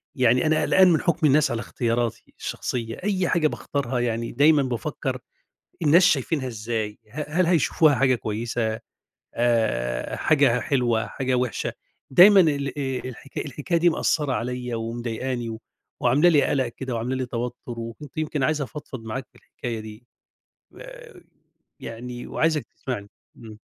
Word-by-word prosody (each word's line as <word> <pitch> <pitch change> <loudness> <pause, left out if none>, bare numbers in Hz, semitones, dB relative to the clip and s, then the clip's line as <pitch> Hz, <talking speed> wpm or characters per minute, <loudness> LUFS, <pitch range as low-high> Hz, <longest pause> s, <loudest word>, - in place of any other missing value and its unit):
يعني 125 +1 +3
أنا 155 0 +3
قلقان 190 -1 +5
من 155 - +2
حُكم 170 -2 +2
الناس 145 -2 +4
على 115 - -2
اختياراتي 120 -1 -2
الشخصية، 115 -2 -4
أي 190 -3 0
حاجة 165 -3 +3
باختارها 135 -4 -3
يعني 115 -1 -1
دايمًا 145 +2 +4
بافكّر 120 -5 -3 0.6
الناس 170 +4 +6
شايفينها 140 -4 +1
إزاي؟ 110 -2 -4
ه 150 +5 -5
هل 175 +3 +2
هيشوفوها 160 -3 +3
حاجة 130 -1 +3
كويسة، 110 0 -2 0.6
آآ 110 - 0
حاجة 140 -6 +3
حلوة، 120 -5 +1
حاجة 130 -1 -2
وِحشة؟ 125 -2 -1 0.4
دايمًا 190 +8 +8
ال 145 -4 0
آآ 130 -2 -2
الح 125 - -13
الحكاية 155 +4 -1
دي 175 +1 +4
مأثّرة 150 -3 0
عليّا 125 +1 -3
ومضايقاني 120 +1 -3
و 110 0 -6 0.4
وعاملة 140 +8 +4
لي 150 -4 +5
قَلَق 130 -3 +1
كده 130 +1 -6
وعاملة 120 +3 -2
لي 130 - -2
توتُّر 120 0 -3 0.3
وكنت 125 +5 -9
يمكن 155 -2 -1
عايز 155 +3 +1
أفضفض 130 -2 -8
معاك 130 +4 -5
في - - -51
الحكاية 115 -2 -6
دي. 110 +2 -11 0.7
آآ - - -12 0.6
يعني 120 +1 -7
وعايزك 155 -2 0
تسمعني 105 -6 -5 0.3
إمم. 110 -2 -11
125 Hz, 145 wpm, -24 LUFS, 115-150 Hz, 0.7 s, دايمًا